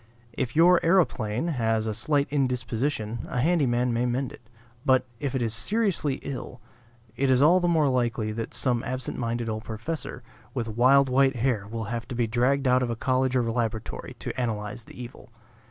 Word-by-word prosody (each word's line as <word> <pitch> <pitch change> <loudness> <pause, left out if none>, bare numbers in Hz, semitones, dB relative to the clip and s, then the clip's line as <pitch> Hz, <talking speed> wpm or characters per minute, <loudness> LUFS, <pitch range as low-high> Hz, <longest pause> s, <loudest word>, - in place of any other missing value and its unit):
If 120 0 -3
your 175 +2 +6
aeroplane 165 - +2
has 115 -6 0
a 110 - -1
slight 140 +6 +1
indisposition, 125 -4 -1
a 125 - -2
handy 160 +1 +2
man 120 0 +1
may 120 +2 +1
mend 125 +1 -1
it. - - -13 0.4
But, 130 -3 +3
if 140 -2 -3
it 125 - 0
is 115 -2 -1
seriously 185 - 0
ill, 125 -2 -6 0.6
it 135 0 +1
is 130 -1 +4
all 165 +6 +6
the 175 - 0
more 160 -4 +3
likely 120 -4 0
that 115 +1 -5
some 125 -3 +1
absent 130 0 -4
minded 120 -1 -2
old 110 -1 -3
professor 120 +3 -5 0.3
with 120 -3 -2
wild 130 +5 +4
white 135 +1 +3
hair 115 -4 0
will 115 0 -4
have 115 -1 -4
to 125 - -6
be 120 -1 +1
dragged 125 +4 +1
out 125 0 +4
of 125 - -1
a 115 - -1
college 130 +2 0
or 125 - +3
laboratory 110 - -3
to - - -5
analyze 110 0 -3
the - - -13
evil. 125 0 -10
125 Hz, 190 wpm, -26 LUFS, 115-140 Hz, 0.6 s, your